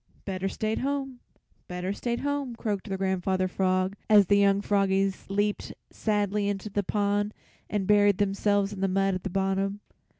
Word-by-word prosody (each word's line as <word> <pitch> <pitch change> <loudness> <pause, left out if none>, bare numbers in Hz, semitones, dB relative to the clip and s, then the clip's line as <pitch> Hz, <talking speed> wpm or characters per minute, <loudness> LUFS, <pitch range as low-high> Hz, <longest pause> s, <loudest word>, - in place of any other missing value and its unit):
"Better 195 -1 -2
stayed 220 +2 -2
home, 270 -2 -2 0.5
better 180 +2 -3
stayed 235 +3 -3
home," 285 -3 -2
croaked 210 -3 -3
their 190 - -2
Grandfather 190 0 0
Frog 185 +1 0
as 210 -2 +7
the 200 +3 +4
young 200 0 +4
froggies 195 -1 +1
leaped 205 +1 -1 0.2
sadly 205 -1 0
into 205 +1 -4
the 205 - 0
pond 205 +1 0 0.3
and 205 -2 -1
buried 205 -1 +4
themselves 200 0 +1
in 195 - -8
the 195 - +2
mud 195 +1 +1
at 185 - -4
the - - -3
bottom. 195 +1 -1
200 Hz, 165 wpm, -27 LUFS, 195-210 Hz, 0.5 s, as